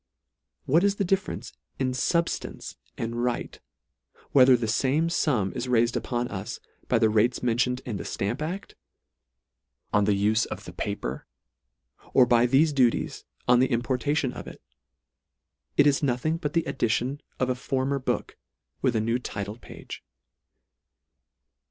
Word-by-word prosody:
What 165 +7 +4
is 200 0 +3
the 200 - -1
difference 195 +3 -2 0.2
in 130 -1 0
fubjlance 170 +6 -1 0.2
and 115 +1 -2
right, 125 -1 -2 0.7
whether 130 -2 +7
the 115 - -2
fame 135 +9 +1
fum 125 - +1
is 125 0 -4
railed 120 -1 +2
upon 120 -1 -1
us 105 +3 -5 0.3
by 125 - +3
the 110 -1 +4
rates 110 +4 +2
mentioned 125 +1 +1
in 115 -5 -3
the - - -5
Stamp 100 +6 -2
a£t, 175 +6 -5 1.2
on 105 0 +4
the 105 - +3
ufe 110 +1 +2
of - - -7
the - - -9
paper, 65 +2 -4 0.9
or 130 - +7
by 120 0 +4
thefe 145 +5 +4
duties, 125 -4 +1 0.2
on 125 0 +6
the 130 - +3
importation 130 +3 0
of - - -8
it. - - -10 1.2
It 145 - +6
is 145 -1 +3
nothing 145 +4 0
but 150 -3 -3
the 165 - +1
edition 125 +3 -1 0.2
of 130 0 +1
a - - +2
former 135 +2 -1
book, 130 - -3 0.4
with 130 -3 +1
a 110 - +2
new 115 +3 0
title 105 -2 -5
page. - - -10
125 Hz, 150 wpm, -26 LUFS, 115-140 Hz, 1.2 s, whether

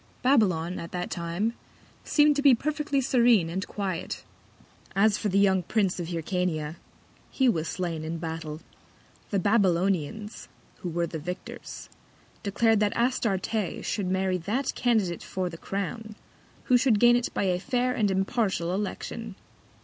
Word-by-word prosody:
Babylon 185 -10 +2
at 170 - -7
that 180 0 -3
Time 175 +6 -1 0.5
seem'd 295 -1 +4
to 285 - +1
be 280 -3 +7
perfectly 295 +1 -1
serene 235 -9 +4
and 190 +3 -3
quiet. 190 -5 -4 0.7
As 205 +1 +4
for 210 - -1
the 195 - +1
young 190 -2 +4
Prince 195 0 0
of 170 - -3
Hyrcania, 165 -2 -2 0.5
he 265 - +2
was 165 -8 +1
slain 170 -4 -3
in 160 +1 -3
Battle. 160 -1 -5 0.7
The 200 - 0
Babylonians, 195 0 +1 0.3
who 180 - -4
were 170 +1 0
the 165 -1 -5
Victors, 180 +4 -7 0.5
declar'd 220 +2 +2
that 210 -1 +1
Astarte 220 -5 0
should 200 -4 -1
marry 190 0 0
that 220 +10 -1
Candidate 215 -8 +1
for 185 -1 -3
the 165 - -8
Crown, 215 +2 -4 0.5
who 250 - +4
should 240 -4 +3
gain 240 +1 +6
it 245 0 0
by - - +1
a 180 -2 +1
fair 250 +3 0
and 215 -4 +1
impartial 190 -2 0
Election. 210 +2 -4
195 Hz, 150 wpm, -27 LUFS, 175-230 Hz, 0.7 s, be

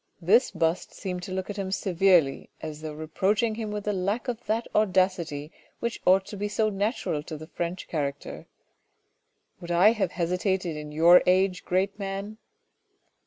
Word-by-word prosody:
This 205 +9 +4
bust 165 +1 -1
seemed 180 -2 -4
to 180 - -7
look 190 +2 -3
at 205 - -8
him 190 -1 -3
severely 180 -7 +2
as 155 -1 -7
though 155 -1 -5
reproach 190 +8 0
ing 225 -2 +1
him 220 -1 -4
with 210 -1 -4
the 210 - -1
lack 200 +7 -2
of 240 -3 -3
that 225 +2 0
audacity 185 -7 +1 0.3
which 235 -1 -3
ought 190 +1 +5
to 205 - -8
be 205 +1 -2
so 215 +1 +1
natural 200 - -1
to 155 0 -7
the 155 - -9
French 175 +2 -5
character. 140 -3 -4 0.6
" - - -46
Would 170 - -8
I 175 +5 +6
have 215 -3 -1
hesitated 180 0 -1
in 150 0 -7
your 170 +4 +7
age 185 0 +2
great 195 +3 0
man 200 +2 -5
185 Hz, 175 wpm, -27 LUFS, 170-205 Hz, 0.6 s, your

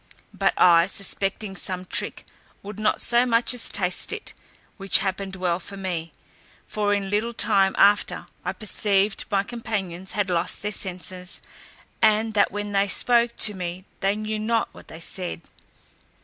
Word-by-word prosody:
But - - 0
I, 170 -1 +6
suspecting 195 +1 -2
some 185 -1 -2
trick, - - -3 0.4
would 205 +1 -8
not 215 0 +1
so 240 0 +4
much 235 0 +3
as 245 - +1
taste 180 -2 +1
it, 435 0 -6 0.4
which 195 -2 +5
happened 195 0 -2
well 180 -2 -1
for 200 +2 -8
me; 175 -4 -4 0.5
for 205 -1 -1
in 200 -1 -1
little 220 +3 0
time 200 -3 +3
after, 205 +1 +3 0.2
I - - -3
perceived 205 -1 +1
my 200 -2 +1
companions 200 -6 -5
had 200 -3 -1
lost 175 +2 0
their 210 - -2
senses, 185 -1 -5 0.6
and 220 0 +3
that 205 -1 +3
when 205 0 -4
they 200 0 +2
spoke 235 +3 +3
to 210 - +4
me, 180 0 -6
they 195 +1 +1
knew 215 0 -3
not 225 +1 0
what - - -15
they 160 - -10
said. 180 -1 -2
200 Hz, 160 wpm, -24 LUFS, 185-215 Hz, 0.6 s, I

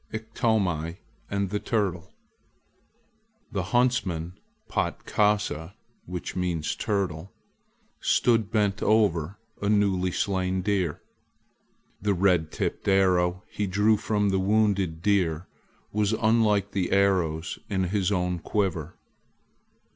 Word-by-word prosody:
IKTOMI 105 -7 -1 0.3
AND 100 -1 -1
THE 105 - 0
TURTLE 100 -8 -2 1.4
THE 95 - -1
huntsman 100 -8 0 0.3
Patkasa 100 -5 0 1.0
(turtle) 95 -3 -2 0.7
stood 115 -4 +2
bent 105 -3 0
over 100 -5 +2 0.2
a 100 - 0
newly 100 -3 +2
slain 95 -1 -1
deer. 95 -6 -1 1.0
The 100 0 +1
red 90 -4 +2
tipped - - -3
arrow 90 -1 +3
he 105 - -2
drew 105 +4 +3
from 105 -1 0
the 95 0 +1
wounded 100 -5 +1
deer 90 -5 +1 0.5
was 105 0 +1
unlike 110 -3 +2
the 95 -2 -1
arrows 90 -5 +1
in 95 -2 0
his 95 +1 0
own 90 -2 0
quiver. 85 -4 -2
100 Hz, 100 wpm, -26 LUFS, 90-105 Hz, 1.4 s, arrow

